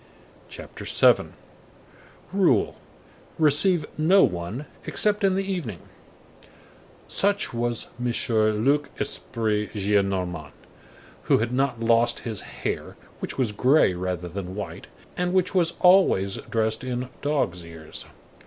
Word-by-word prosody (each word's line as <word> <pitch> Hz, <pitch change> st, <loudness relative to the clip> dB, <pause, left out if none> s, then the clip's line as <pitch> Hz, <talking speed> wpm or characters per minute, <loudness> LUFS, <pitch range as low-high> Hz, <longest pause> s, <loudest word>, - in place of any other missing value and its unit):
CHAPTER -, -, -9 dB
VII—RULE: 185 Hz, -, 0 dB, 0.6 s
RECEIVE 155 Hz, +2 st, +3 dB
NO 185 Hz, +5 st, +5 dB
ONE 90 Hz, +11 st, -2 dB, 0.2 s
EXCEPT 210 Hz, -1 st, +1 dB
IN 190 Hz, -1 st, +3 dB
THE 195 Hz, -, 0 dB
EVENING 175 Hz, -, -4 dB, 1.3 s
Such 200 Hz, -6 st, +1 dB
was 120 Hz, 0 st, -2 dB, 0.2 s
M. 120 Hz, -, +1 dB, 0.5 s
Luc 145 Hz, +2 st, +2 dB
Esprit 110 Hz, -3 st, -2 dB
Gillenormand, 95 Hz, -6 st, 0 dB, 0.7 s
who -, -, +4 dB
had 115 Hz, +2 st, -1 dB
not 130 Hz, -2 st, 0 dB
lost 115 Hz, +1 st, +3 dB
his 110 Hz, -4 st, -3 dB
hair,—which -, -, -6 dB
was 125 Hz, -5 st, +1 dB
gray 130 Hz, 0 st, +4 dB
rather 90 Hz, -1 st, -3 dB
than 90 Hz, +1 st, -6 dB
white,—and 180 Hz, -, -6 dB
which 185 Hz, -1 st, +2 dB
was 175 Hz, -3 st, +2 dB
always 180 Hz, -, +4 dB
dressed 110 Hz, 0 st, 0 dB
in 125 Hz, 0 st, -3 dB
"dog's 140 Hz, -, -1 dB
ears." 80 Hz, -2 st, -8 dB
120 Hz, 105 wpm, -25 LUFS, 100-160 Hz, 1.3 s, NO